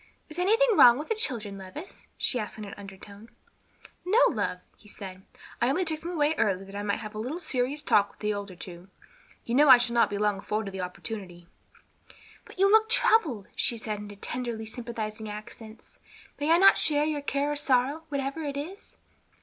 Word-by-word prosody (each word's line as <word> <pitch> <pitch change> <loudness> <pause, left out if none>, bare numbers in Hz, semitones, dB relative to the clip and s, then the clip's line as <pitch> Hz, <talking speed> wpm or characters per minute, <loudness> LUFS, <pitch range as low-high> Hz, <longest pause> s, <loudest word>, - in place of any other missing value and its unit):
"Is 310 +3 -8
anything 445 +7 +4
wrong 240 -6 +8
with 300 - -6
the - - +3
children, 225 - -2
Levis?" 195 - -10
she 250 - +1
asked 210 -1 -5
in 215 - -7
an 200 - -9
undertone. 200 +2 -12 0.7
"No, 375 +5 +1
love," 205 -6 -2 0.2
he - - -20
said; 190 -3 -9 0.4
"I 240 +2 +3
took 315 -3 -1
them 335 - -6
away 310 -3 +1
early 195 -2 +1
that 195 +1 -12
I 205 - -3
might 205 +1 -2
have 215 -1 -7
a 215 - -6
little 265 +10 -4
serious 285 -2 -2
talk 200 -7 +3
with - - -23
the 210 0 -1
older 200 -2 -6
two. 175 +1 -10 0.6
You 235 - -3
know 290 +3 +5
I 255 - +11
shall 240 -1 -1
not 235 - +3
long 205 0 0
be - - -8
afforded 210 0 -3
the 190 -1 -5
opportunity." 180 -1 -7 1.0
"But - - -15
you 395 +1 +4
look 440 0 +5
troubled," 300 - +3
she 235 - 0
said, 215 -2 -4
in 210 0 -8
tenderly 235 +1 -4
sympathizing 220 -2 -6
accents. 215 +1 -11 0.4
"May 290 +2 -1
I 335 - +7
not 390 +2 +6
share 295 -1 +2
your 305 -2 -2
care 285 +1 -1
or - - -1
sorrow, 285 +2 +1
whatever 280 +2 -3
it 285 -2 -4
is?" 355 +8 -8
235 Hz, 200 wpm, -27 LUFS, 205-295 Hz, 1.0 s, I